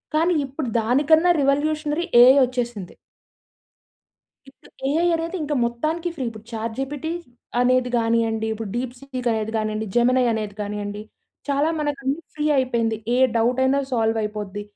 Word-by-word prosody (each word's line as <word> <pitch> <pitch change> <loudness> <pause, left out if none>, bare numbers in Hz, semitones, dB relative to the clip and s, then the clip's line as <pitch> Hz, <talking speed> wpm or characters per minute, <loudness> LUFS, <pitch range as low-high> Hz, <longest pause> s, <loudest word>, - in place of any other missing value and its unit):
కానీ 330 +3 +3
ఇప్పుడు 270 +1 -5
దానికన్నా 300 +9 +4
రివల్యుషనరి 300 +3 0 0.2
ఎఐ 255 +2 +8
వచ్చేసింది. 240 -6 -4 1.5
ఇప్పుడు 270 - -19 0.2
ఏఐ 330 +4 +2
అనేదింక 330 -2 -3
మొత్తానికి 310 +9 -2
ఫ్రీ. 275 -6 -4
ఇప్పుడు 220 -1 -12
చాట్‌జీపిటీ 265 +7 -4 0.5
అనేది 250 0 +2
గానీయండి, 225 -1 +1
ఇప్పుడు 220 -2 -5
డీప్‌సీక్ 255 0 -4
అనేది 220 0 -2
గానియండి, 215 0 -2
జెమినై 250 +1 +4
అనేది 215 -2 -3
గానీయండి 205 0 -5 0.5
చాలా 285 +2 +2
మనకన్ని 285 -1 -2 0.2
ఫ్రీ 300 - -3
అయిపోయింది. 235 -4 +1 0.2
ఏ - - +2 0.2
డవుటయినా 260 +4 +2
సాల్వయిపోద్ది. 215 -3 -1
250 Hz, 120 wpm, -22 LUFS, 225-290 Hz, 1.5 s, ఎఐ